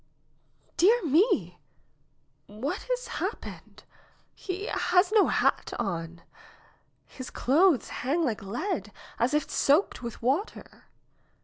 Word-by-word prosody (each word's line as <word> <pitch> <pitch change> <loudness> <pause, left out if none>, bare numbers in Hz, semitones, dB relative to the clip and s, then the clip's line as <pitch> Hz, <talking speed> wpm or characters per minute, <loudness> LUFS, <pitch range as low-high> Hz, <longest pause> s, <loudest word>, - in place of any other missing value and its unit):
"Dear 420 +4 +4
me! 330 - +2 0.9
what 220 - -5
has - - -1
happened? - - -6 0.5
He 380 +1 -5
has 360 -3 +2
no 430 -2 +5
hat - - +1
on! 170 -2 -4 0.8
His 260 -1 -9
clothes 310 +2 +3
hang 310 +6 +1
like 225 -6 -2
lead, 210 - -3 0.3
as 255 +5 +2
if 300 - 0
soaked 295 +3 +2
with 235 -2 -6
water! 275 - -3
295 Hz, 105 wpm, -27 LUFS, 235-380 Hz, 0.9 s, no